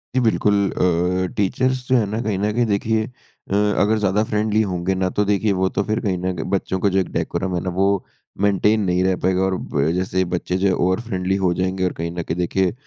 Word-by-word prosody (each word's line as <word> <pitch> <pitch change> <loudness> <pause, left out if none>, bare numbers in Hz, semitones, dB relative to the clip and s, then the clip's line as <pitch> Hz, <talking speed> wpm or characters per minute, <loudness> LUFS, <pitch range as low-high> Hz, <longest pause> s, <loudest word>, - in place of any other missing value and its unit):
जी, - - +4
बिल्कुल। 105 -3 +2 0.2
अ, 90 +1 +1
टीचर्स 130 +6 0
जो 130 - +4
है 110 - +2
ना 110 - -2
कहीं 105 -4 -1
न 105 +1 0
कहीं 120 +2 +2
देखिए 110 +1 0 0.5
अ, 100 - 0 0.3
अगर 110 +2 +3
ज़्यादा 105 +1 +1
फ्रेंडली 110 -1 +1
होंगे 90 -2 -1
ना 95 0 0
तो 105 - 0
देखिए 105 +1 +1
वो 95 - +3
तो 100 - +1
फिर 110 +2 -1
कहीं 95 -3 -1
न 90 +1 -2
कहीं 80 - -4
बच्चों 95 -1 -1
का 100 - +2
जो 95 0 +1
एक 95 - 0
डेकोरम 95 -1 -2
है 85 - -1
ना 95 - -2
वो 95 +1 +2 0.6
मेंटेन 105 +2 +3
नहीं 90 0 +1
रह 95 0 +2
पाएगा 95 0 +2
और 95 -1 +1
ब 70 -3 -1
जैसे 95 0 0
बच्चे 90 +1 -1
जो 95 -1 +2
ओवर 95 +4 +1
फ़्रेंडली 95 -4 -2
हो 90 - +3
जाएँगे 95 +1 -1
और 90 - -1
कहीं 85 +1 -4
न 85 - -4
कहीं 80 +3 -4
देखिए, 90 +2 0
95 Hz, 240 wpm, -21 LUFS, 90-105 Hz, 0.6 s, जी